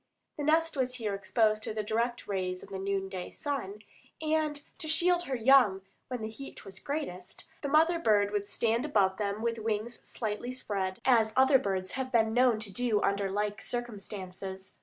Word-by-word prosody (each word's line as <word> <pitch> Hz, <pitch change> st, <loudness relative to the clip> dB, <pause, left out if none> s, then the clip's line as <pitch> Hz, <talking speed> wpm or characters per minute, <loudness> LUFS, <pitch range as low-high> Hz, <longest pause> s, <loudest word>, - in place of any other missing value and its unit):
The 295 Hz, -, -4 dB
nest 325 Hz, +2 st, +3 dB
was 255 Hz, -2 st, 0 dB
here 220 Hz, -5 st, -2 dB
exposed 215 Hz, +2 st, +2 dB
to 215 Hz, -, -5 dB
the 215 Hz, -, -1 dB
direct 235 Hz, +3 st, -1 dB
rays 185 Hz, -2 st, -2 dB
of -, -, -12 dB
the 195 Hz, -1 st, -5 dB
noon 195 Hz, 0 st, -1 dB
day 185 Hz, -2 st, -5 dB
sun, 215 Hz, -8 st, -4 dB, 0.4 s
and 310 Hz, -1 st, 0 dB, 0.2 s
to 320 Hz, -, -2 dB
shield 345 Hz, +3 st, +3 dB
her 270 Hz, -, -2 dB
young 235 Hz, -6 st, +5 dB, 0.2 s
when 250 Hz, -3 st, -4 dB
the 220 Hz, -, -3 dB
heat 275 Hz, +5 st, -10 dB
was 190 Hz, 0 st, -7 dB
greatest, 195 Hz, -, -5 dB
the 285 Hz, -, -2 dB
mother 320 Hz, +4 st, +4 dB
bird 205 Hz, -8 st, +3 dB
would 205 Hz, -1 st, -1 dB
stand 230 Hz, +3 st, +1 dB
above 200 Hz, -10 st, +2 dB
them 205 Hz, +1 st, -2 dB
with 230 Hz, -1 st, 0 dB
wings 220 Hz, +2 st, -2 dB
slightly 225 Hz, +2 st, -4 dB
spread, 195 Hz, -7 st, -2 dB
as 225 Hz, -4 st, +4 dB
other 265 Hz, +1 st, +6 dB
birds 190 Hz, -5 st, -2 dB
have 260 Hz, -1 st, -3 dB
been 225 Hz, -2 st, +3 dB
know 245 Hz, -1 st, +5 dB
to 210 Hz, -3 st, -4 dB
do 235 Hz, -1 st, +1 dB
under 200 Hz, 0 st, +1 dB
like 210 Hz, +1 st, -2 dB
circumstances. 195 Hz, -5 st, -6 dB
220 Hz, 185 wpm, -30 LUFS, 200-260 Hz, 0.4 s, other